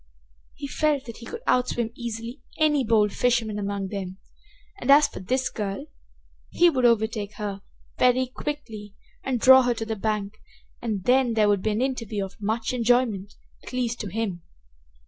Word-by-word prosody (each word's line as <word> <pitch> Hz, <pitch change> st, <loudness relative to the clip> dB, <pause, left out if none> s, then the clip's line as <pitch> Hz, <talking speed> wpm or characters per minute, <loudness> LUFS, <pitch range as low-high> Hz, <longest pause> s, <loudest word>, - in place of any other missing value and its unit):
He -, -, -7 dB
felt 295 Hz, -1 st, 0 dB
that 230 Hz, -, -9 dB
he 235 Hz, -, -10 dB
could 465 Hz, +1 st, -7 dB
outswim 240 Hz, -2 st, +1 dB
easily 235 Hz, +1 st, -6 dB, 0.2 s
any 300 Hz, -3 st, +3 dB
bold 215 Hz, -3 st, +3 dB
fisherman 230 Hz, -4 st, +1 dB
among 200 Hz, -1 st, -3 dB
them, 190 Hz, -2 st, -5 dB, 0.6 s
and 260 Hz, -, -5 dB
as 290 Hz, +2 st, +7 dB
for -, -, -9 dB
this 260 Hz, +8 st, -1 dB
girl, 205 Hz, +6 st, -4 dB, 0.6 s
he 350 Hz, 0 st, +4 dB
would 255 Hz, -4 st, +1 dB
overtake 220 Hz, -3 st, +1 dB
her 200 Hz, -2 st, -5 dB, 0.4 s
very 250 Hz, +1 st, +4 dB
quickly 245 Hz, -7 st, -6 dB, 0.3 s
and 260 Hz, -2 st, -1 dB
draw 260 Hz, +2 st, +8 dB
her 245 Hz, -1 st, +1 dB
to 225 Hz, -, -4 dB
the 220 Hz, 0 st, -3 dB
bank, 210 Hz, 0 st, -3 dB, 0.4 s
and 215 Hz, -5 st, -2 dB
then 250 Hz, -1 st, +3 dB
there 215 Hz, -2 st, +4 dB
would 200 Hz, -2 st, +2 dB
be 220 Hz, -, 0 dB
an 215 Hz, +4 st, 0 dB
interview 230 Hz, -6 st, -2 dB
of 195 Hz, +3 st, -14 dB
much 220 Hz, +4 st, -1 dB
enjoyment, 235 Hz, -5 st, +1 dB, 0.3 s
at -, -, -11 dB
least 240 Hz, -2 st, -1 dB
to 210 Hz, -, -4 dB
him. 195 Hz, -3 st, -3 dB
230 Hz, 170 wpm, -25 LUFS, 210-255 Hz, 0.6 s, draw